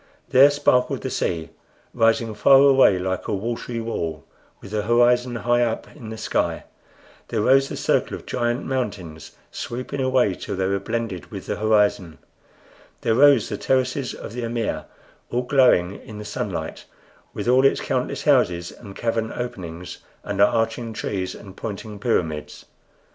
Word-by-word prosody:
There 135 +3 +7
sparkled 135 -3 +1
the - - -4
sea, 80 -2 -2 0.4
rising 115 0 +2
far 105 +6 +6
away 135 -7 +6
like 95 0 -3
a - - 0
watery 115 +3 -4
wall, 85 -9 -4 0.3
with 100 - -12
the 105 -1 0
horizon 120 +2 +3
high 120 +1 +1
up 115 -2 -2
in 110 - -9
the 110 - -6
sky; - - -1 0.6
there 110 - -1
rose 135 +4 +4
the - - -5
circle - - 0
of - - -11
giant 120 +1 -1
mountains, 95 - -4 0.2
sweeping 130 +3 -5
away 130 -6 +2
till - - -5
they 95 0 -1
were 100 +1 0
blended 100 -6 -4
with - - -8
the - - -3
horizon; 105 -7 +1 0.8
there 115 - +1
rose 135 -1 +5
the - - -4
terraces 130 0 0
of - - -9
the 125 - -4
amir, 115 -1 -2 0.4
all 125 +1 -1
glowing 125 -9 +3
in 110 -4 -10
the 105 - -7
sunlight, 105 - -4 0.5
with - - -4
all 130 +2 +5
its 135 - +4
countless 125 -1 -2
houses 90 - +2
and 100 -4 -12
cavern 115 -1 -1
openings 90 -7 -6 0.2
and 100 -1 -2
arching 115 +2 +1
trees 95 -3 -3
and 95 -2 -12
pointing 105 -1 -6
pyramids. 80 -10 -2
115 Hz, 160 wpm, -23 LUFS, 100-125 Hz, 0.8 s, There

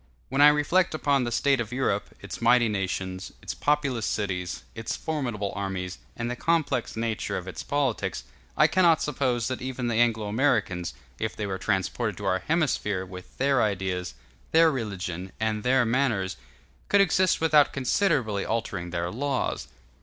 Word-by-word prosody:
When 135 +2 +1
I 145 - +10
reflect 155 +4 +3
upon 140 -4 +2
the 120 - -3
state 135 +2 +2
of 110 - -5
Europe, 125 -6 0
its - - -7
mighty 125 -1 +5
nations, 95 -2 -3
its - - -4
populous 145 -6 0
cities, 90 -4 -2
its 115 -1 -4
formidable 120 -10 -3
armies, 95 -2 -4 0.2
and 115 - -2
the 125 - -2
complex 145 -6 0
nature 115 -1 -2
of 90 - -6
its 80 -4 -6
politics, 140 -5 -1 0.3
I - - +6
cannot 170 -4 +4
suppose 130 -5 0
that 130 -3 -3
even 130 -1 -3
the 115 - 0
Anglo 115 -2 +2
Americans, 105 -6 0 0.2
if - - -2
they 105 - -3
were 95 -1 -3
transported 95 -4 -1
to - - -6
our 95 - +2
hemisphere, 120 - 0
with 90 0 -11
their 135 -1 +3
ideas, 95 - -1 0.4
their 165 0 +6
religion, 95 - -4
and 110 -1 0
their 125 +1 +3
manners, 115 -6 +1 0.5
could 200 - +5
exist 185 -1 +3
without 155 -2 +4
considerably 130 - +1
altering 100 -6 -2
their 85 0 -2
laws. 135 +3 -2
115 Hz, 160 wpm, -26 LUFS, 95-140 Hz, 0.5 s, I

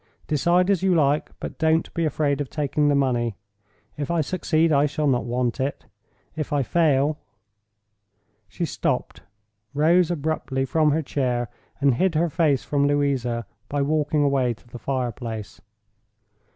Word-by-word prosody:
Decide 175 +5 +2
as 195 - +1
you 190 -2 +3
like, 145 -1 +2
but - - -7
don't 160 0 +1
be 170 - 0
afraid 145 -1 0
of 140 - -4
taking 150 0 0
the 145 - +3
money. 120 -5 +1 0.6
If 145 -2 -3
I 170 -1 +1
succeed, 165 0 +1
I 145 0 +4
shall 150 +1 -2
not 130 -4 +1
want 120 +1 -1
it. 135 +2 -3 0.5
If 155 -2 -4
I 145 -2 +2
fail—" 150 -1 +2 1.3
She 105 +12 -3
stopped, - - -2 0.5
rose 165 +4 +4
abruptly 150 -5 -1
from 155 +3 +2
her 155 +2 +1
chair, 125 -4 -1 0.3
and 140 -2 +3
hid 175 +7 +1
her 165 +1 +1
face 145 -5 +2
from 140 -1 +1
Louisa 135 -5 0 0.2
by 145 -1 0
walking 150 0 +1
away 135 -4 +1
to 115 - -25
the 120 0 -10
fire 130 0 -1
place. 110 -2 -7
145 Hz, 155 wpm, -24 LUFS, 130-155 Hz, 1.3 s, I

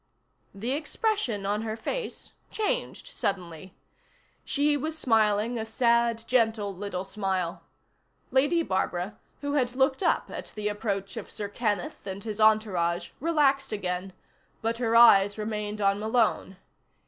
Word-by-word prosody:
_ - - -10
The 235 +5 -2
expression 305 - -1
on 205 +2 0
her 220 -1 -3
face 480 - -4 0.2
changed - - -2
suddenly. 180 -2 -4 0.7
She 295 +1 +1
was 310 +3 -3
smiling 220 -2 +2
a - - -2
sad, 235 0 +2
gentle 220 -5 +1
little 185 -1 -4
smile. 190 -3 -2 0.7
Lady 290 +6 +3
Barbara, 190 - -2 0.2
who 285 0 -2
had 250 -4 +1
looked 265 +2 +2
up 345 - +1
at - - -7
the 210 -1 -1
approach 200 -2 -3
of - - -6
Sir 210 -2 -5
Kenneth 205 -3 -2
and 195 +1 -5
his 215 -1 -4
entourage, 200 -6 +2
relaxed 280 -3 +2
again, 185 -2 -3 0.5
but 230 +1 -1
her 230 -2 +1
eyes 205 -4 +7
remained 210 -1 -3
on 200 0 +2
Malone. 220 -3 +1
220 Hz, 135 wpm, -27 LUFS, 200-255 Hz, 0.7 s, eyes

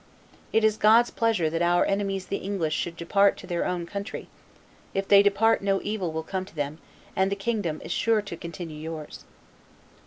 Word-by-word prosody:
It 225 - +3
is 215 -1 +3
God's 225 +3 +5
pleasure 225 -8 +1
that 165 +2 -1
our 175 0 +3
enemies 195 -1 -1
the 200 - -2
English 185 -6 -2
should 170 +1 -2
depart 200 +4 +3
to - - -10
their 175 -2 -1
own 175 -1 -2
country; 200 +4 -6 0.7
if 195 0 -1
they 200 -1 +8
depart 205 +3 +3
no 195 -1 +1
evil 205 -5 -2
will 160 0 -3
come 185 +3 -3
to 190 - -17
them, 145 +1 -3 0.4
and 190 +1 +2
the - - +1
kingdom 200 -6 -2
is - - -6
sure 220 +3 +2
to 200 -4 -6
continue 165 -1 -7
yours." 155 -1 -7
195 Hz, 190 wpm, -26 LUFS, 170-205 Hz, 0.7 s, they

